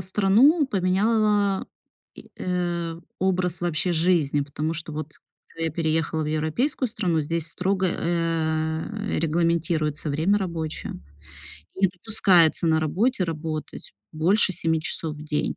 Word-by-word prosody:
страну, 210 - +4
поменяла, 205 0 +1 0.5
и, - - -14
э, 175 -2 -2 0.2
образ 180 -2 0
вообще 175 +1 0
жизни, 160 -4 +2
потому 150 +3 -3
что, 160 -1 -6
вот 155 0 -5 0.4
когда 165 - -5
я - - -1
переехала 160 0 0
в - - -3
европейскую 160 - 0
страну, 185 -8 0
здесь 165 +2 -2
строго, 190 +4 0
э, 165 +3 -1
регламентируется 165 -2 0
время 165 +8 +2
рабочее, 165 -5 -4 0.8
не 190 0 +3
допускается 180 -3 +3
на 160 -1 +3
работе 195 - +1
работать 155 -2 -5 0.2
больше 190 +6 +2
7 160 -2 0
часов 155 0 -4
в 150 - -9
день. 150 -1 -1
170 Hz, 125 wpm, -24 LUFS, 155-190 Hz, 0.8 s, страну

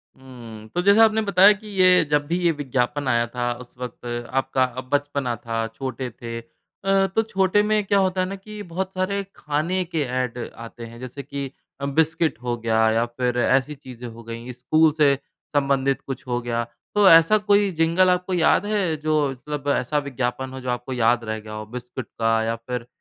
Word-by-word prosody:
हुँ, 120 -5 -11
तो 175 - +2
जैसे 200 +3 +5
आपने 220 0 +5
बताया 200 0 +6
कि 210 +1 -12
ये 185 -3 +5
जब 145 0 +2
भी 170 +3 0
ये 170 - +4
विज्ञापन 135 0 -1
आया 120 -2 +2
था 120 0 -2
उस 125 - -14
वक़्त 125 -1 -8 0.4
आपका 130 -1 +1 0.3
बचपना 145 -4 0
था, 115 -1 -3
छोटे 130 +2 -5
थे। 115 0 -7
अ, 195 +11 -2
तो 225 - +4
छोटे 195 +1 +3
में 215 -1 +3
क्या 200 0 +3
होता 185 -1 +1
है 185 - 0
ना, 195 - -5
कि 210 +2 -9
बहुत 185 +2 -4
सारे 200 +2 -1
खाने 155 +5 -1
के 165 -2 -2 0.2
एड 125 -1 -2 0.3
आते 115 0 -10
हैं 115 +1 -11
जैसे 130 +3 -7
कि 140 0 -5 0.3
बिस्किट 160 0 +1
हो 120 -1 -1
गया 110 -1 +2
या 115 +1 +2
फिर 125 +1 -2
ऐसी 135 +4 +2
चीज़ें 125 -3 -10
हो 115 0 -11
गई 115 +2 -7
स्कूल 155 +6 +3
से 140 -2 +6 0.4
संबंधित 140 -1 +1
कुछ 135 -1 -7
हो 120 -1 0
गया, 120 -1 -1 0.3
तो 205 -2 +7
ऐसा 165 +6 +7
कोई 205 -1 +3
जिंगल 170 +3 +4
आपको 180 +1 0
याद 175 +3 +3
है 200 -6 0
जो 155 -1 +1
मतलब 140 +2 -6
ऐसा 130 +4 -1
विज्ञापन 130 0 -3
हो 130 - -6
जो 130 - -5
आपको 125 +1 -3
याद 120 -1 +2
रह 110 -1 -3
गया 110 0 -10
हो 110 0 -6
बिस्किट 125 0 -6
का 115 0 +1
या 115 +1 -1
फिर 120 +1 -6
135 Hz, 195 wpm, -23 LUFS, 120-180 Hz, 0.4 s, तो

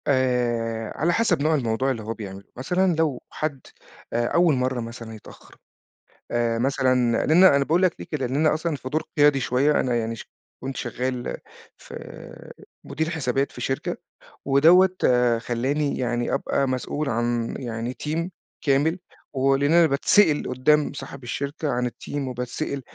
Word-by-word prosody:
آآ، 120 -4 0
على 170 +3 +1
حسب 195 -8 +2
نوع 155 +2 +2
الموضوع 130 0 0
اللي 115 -4 -4
هو 110 +2 -3
بيعمله 100 -3 -8
مثلًا، 180 +7 +1
لو 155 -5 0
حد 150 -3 -3 0.5
آآ، 120 +1 +1
أول 170 +1 +3
مرّة 130 -1 -1
مثلًا 115 -1 -8
يتأخّر، 110 - -15 0.8
آآ، 115 -1 0
مثلًا 130 -2 +1
لأن 170 +5 +6
أنا 140 -6 +6
باقول 165 +6 +2
لَك 185 -3 +3
ليه - - -7
كده، 145 -5 -1
لإن 130 +3 -2
أنا 155 +1 +3
أصلًا 160 0 -2
في 130 - -7
دور 155 +4 -1 0.2
قيادي 145 -2 +5
شوية، 130 +5 +2
أنا 125 -1 0
يعني 115 0 -2
ش - - -11 0.3
كنت 135 +1 -5
شغال 125 0 -3 0.4
في - - -13
آآ، - - -10 0.3
مدير 160 +3 -2
حسابات 135 -4 -1
في - - -10
شركة، 135 - -2 0.5
ودوّة 170 +7 +5
آآ، 125 -2 +3
خلاني 135 +5 -1
يعني 120 -1 -1
أبقى 140 0 0
مسؤول 130 +3 -2
عن 120 -1 -1
يعني 120 -1 -4
تيم 165 +6 -3 0.3
كامل، 150 +5 +2 0.4
ولأن 135 +2 +2
أنا 170 0 +6
باتسأل 150 +3 +3
قدّام 145 +4 +2
صاحب 135 -1 -9
الشركة 140 +5 -3
عن 125 0 0
التيم 135 +3 -5
وباتسأل 125 +3 -4
135 Hz, 160 wpm, -24 LUFS, 120-150 Hz, 0.8 s, لأن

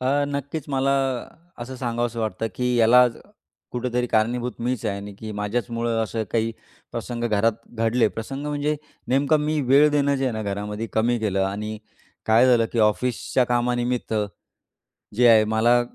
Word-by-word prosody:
अ, 140 +3 +1
नक्कीच, 140 +1 -4
मला 135 0 +1 0.7
असं 130 +2 -6
सांगावसं 120 -1 -2
वाटतं, 110 0 -2
की 125 0 0
याला 120 +2 +6 0.7
कुठेतरी 125 0 -1
कारणीभूत 120 +2 0
मीच 120 0 -2
आहे 100 - -1
आणि 100 0 -8
की 110 -1 -6
माझ्याचमुळं 115 +2 -1
असं 110 0 -2
काही 115 0 +1 0.4
प्रसंग 120 -1 -4
घरात 110 0 +2 0.2
घडले. 115 0 +2
प्रसंग 135 +7 -6
म्हणजे 150 +1 -1 0.3
नेमकं 140 +4 +3
मी 150 0 0
वेळ 140 +4 +5
देणं 140 -1 +2
जे 135 - -1
आहे 130 - 0
ना 110 0 -3
घरामध्ये 105 +2 -4
कमी 120 +2 +1
केलं 100 -3 0
आणि 105 +2 -4 0.5
काय 115 +3 +5
झालं, 120 -3 +4
की 120 - -2
ऑफिसच्या 120 +3 +1
कामानिमित्त 120 -1 0 1.0
जे 120 +1 +5
आहे, 110 -2 +7
मला 110 +3 +3
120 Hz, 155 wpm, -23 LUFS, 110-130 Hz, 1.0 s, आहे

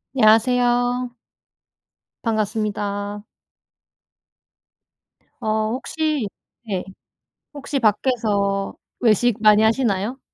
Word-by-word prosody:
안녕하세요? 245 +2 +3 1.1
반갑습니다. 210 -2 -2 2.2
어 215 0 0
혹시 300 0 -2 0.4
네. 190 -4 -2 0.7
혹시 280 -1 -3
밖에서 210 -4 +1 0.3
외식 230 0 +2
많이 215 -1 +6
하시나요? 225 0 +1
220 Hz, 155 characters per minute, -21 LUFS, 210-245 Hz, 2.2 s, 많이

